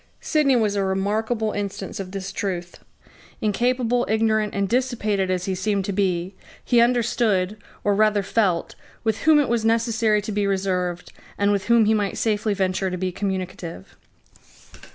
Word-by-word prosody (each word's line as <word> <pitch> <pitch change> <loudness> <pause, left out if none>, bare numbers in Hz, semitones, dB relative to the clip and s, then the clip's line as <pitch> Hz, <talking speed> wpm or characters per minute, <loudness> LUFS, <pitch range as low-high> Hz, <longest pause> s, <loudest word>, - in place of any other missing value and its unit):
Sidney 300 -4 +2
was 215 -4 +1
a 200 - +1
remarkable 215 +4 0
instance 200 -1 -5
of 190 -2 -5
this 195 0 -5
truth. 175 -3 -4 0.6
Incapable, 245 +3 +1
ignorant, 220 -1 +1
and 200 0 0
dissipated 220 -5 0
as 180 -1 -1
he 190 - -1
seemed 195 +1 -1
to 200 - -2
be, 185 -2 0 0.3
he 240 -2 +4
understood, 230 -5 +1 0.3
or 205 - +2
rather 210 0 +3
felt, 190 -4 0 0.3
with 220 -1 0
whom 310 - +7
it 290 - +2
was 235 -2 0
necessary 225 -1 +2
to 210 +1 -5
be 205 -1 0
reserved, 185 -3 -2 0.2
and 200 0 +2
with 200 -2 0
whom 235 -1 +4
he 220 - +3
might 205 -2 -1
safely 210 -1 0
venture 190 0 0
to 180 - -4
be 185 0 -2
communicative. 185 - -5
205 Hz, 160 wpm, -23 LUFS, 190-225 Hz, 0.6 s, whom